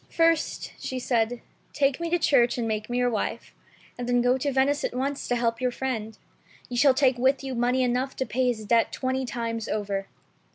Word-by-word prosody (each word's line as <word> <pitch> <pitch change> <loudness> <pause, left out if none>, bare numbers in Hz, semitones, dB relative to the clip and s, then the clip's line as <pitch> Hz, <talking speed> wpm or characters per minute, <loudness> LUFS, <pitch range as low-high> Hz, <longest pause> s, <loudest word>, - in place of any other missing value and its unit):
"First," 330 -1 +1
she 260 - -4
said, 240 -1 0 0.3
"take 275 -1 +1
me 340 0 -2
to 350 - +2
church 255 -7 +3
and 235 -2 -1
make 215 0 -3
me 245 - -1
your 245 0 +2
wife, 215 - -3 0.5
and 245 0 -3
then 245 0 +3
go 245 +1 +4
to 280 +2 -1
Venice 275 +2 +2
at - - -2
once 275 +2 -2
to 245 - +1
help 230 0 0
your 250 - +2
friend. 235 -4 -4 0.5
You 245 - -3
shall 270 +1 +5
take 260 -3 +3
with 265 +2 +2
you 265 -1 -4
money 250 +2 +1
enough 250 +2 -1
to 260 - -2
pay 255 +1 0
his 220 -3 -1
debt 230 +2 +3
twenty 260 0 -2
times 230 -2 -3
over." 200 -2 -2
250 Hz, 210 wpm, -26 LUFS, 235-265 Hz, 0.5 s, shall